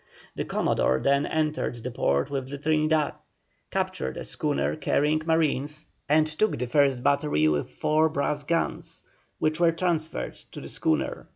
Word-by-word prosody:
The - - -3
Commodore 65 - +1
then 140 +1 +2
entered 155 -4 -1
the 125 - -4
port 70 - 0
with 135 -2 -3
the 140 - -5
Trinidad, 155 +1 +1 0.6
captured 65 0 -2
a - - -4
schooner 150 -2 -1
carrying 150 +1 +1
marines, 155 -2 0 0.2
and 155 +1 +5
took 155 +8 0
the 125 - -2
first 135 -1 +2
battery 140 - +2
with 75 -2 0
four 155 +1 +2
brass 145 -1 -1
guns, 165 +3 -2 0.3
which 155 +1 0
were 170 -1 +5
transferred 165 -2 -1 0.2
to - - -7
the - - -7
schooner. 75 -4 -1
150 Hz, 155 wpm, -26 LUFS, 135-155 Hz, 0.6 s, and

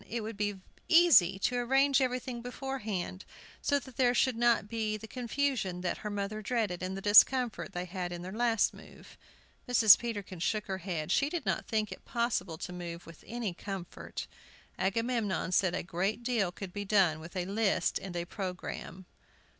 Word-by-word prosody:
It 235 0 -2
would 220 +1 -5
be 205 -1 -2 0.3
easy 325 - +6
to 245 +5 0
arrange 270 +3 +3
everything 250 -1 -2
beforehand, 230 -7 -4 0.4
so 285 - +2
that 260 -3 -9
there 250 -1 +3
should 260 0 +3
not 235 -3 +3
be 215 -1 -2
the 220 - -10
confusion 240 -7 -2
that 180 - -2
her 210 - -4
mother 205 +1 -3
dreaded, 215 -5 -1
and 185 +1 -3
the 195 - -7
discomfort 220 0 +5
they 180 0 -3
had 180 -1 -4
in 175 0 -6
their 185 - -6
last 230 +1 +2
move. - - -14 0.5
Mrs. 220 -4 +8
Peterkin 205 -6 -5
shook 210 +5 0
her 190 -1 -4
head; 170 -4 -3
she 280 - +3
did 345 +1 -4
not - - -1
think 215 -2 -1
it - - -9
possible 225 -9 -1
to 180 +1 -6
move 175 -1 -7
with 165 -1 -13
any 230 -4 -3
comfort. 190 -1 -6 0.5
Agamemnon 220 -1 0
said 185 -1 +2
a - - -2
great 190 +7 -2
deal 230 -7 +1
could 180 0 -8
be 205 - -3
done 190 -6 +3
with 165 +4 -11
a 180 -1 -1
list 195 -2 +1
and 190 -2 -8
a 170 0 -2
programme. 185 -1 -6
205 Hz, 180 wpm, -31 LUFS, 185-240 Hz, 0.5 s, Mrs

